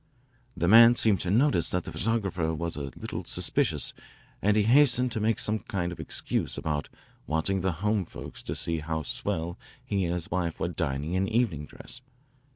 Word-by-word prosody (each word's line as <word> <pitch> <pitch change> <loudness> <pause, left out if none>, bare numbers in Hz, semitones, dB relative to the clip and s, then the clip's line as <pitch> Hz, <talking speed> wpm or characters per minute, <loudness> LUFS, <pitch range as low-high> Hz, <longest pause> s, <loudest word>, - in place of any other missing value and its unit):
The 85 - +1
man 115 +4 +8
seemed 110 -5 +2
to 90 - -2
notice 115 - +3
that 90 -1 -1
the - - -7
photographer 95 -7 -1
was 85 +1 -3
a 70 -2 -5
little - - -5
suspicious - - +1 0.5
and 105 +2 +3
he 105 - +4
hastened 125 +1 +4
to 110 - -2
make 110 +1 +1
some 110 +1 0
kind 90 -4 -3
of 85 - -9
excuse - - -2
about 75 -2 -2 0.4
wanting 80 +5 0
the 95 +1 +1
home 105 -3 +1
folks - - -9
to - - -5
see 85 -1 -1
how 80 0 -3
swell 80 +4 -2 0.3
he 100 -2 0
and 85 +1 -1
his 85 -2 -2
wife 85 -2 -2
were 85 - -1
dining 80 -2 -2
in 95 +1 +1
evening 105 -11 0
dress. 125 - -10
90 Hz, 185 wpm, -28 LUFS, 80-110 Hz, 0.5 s, man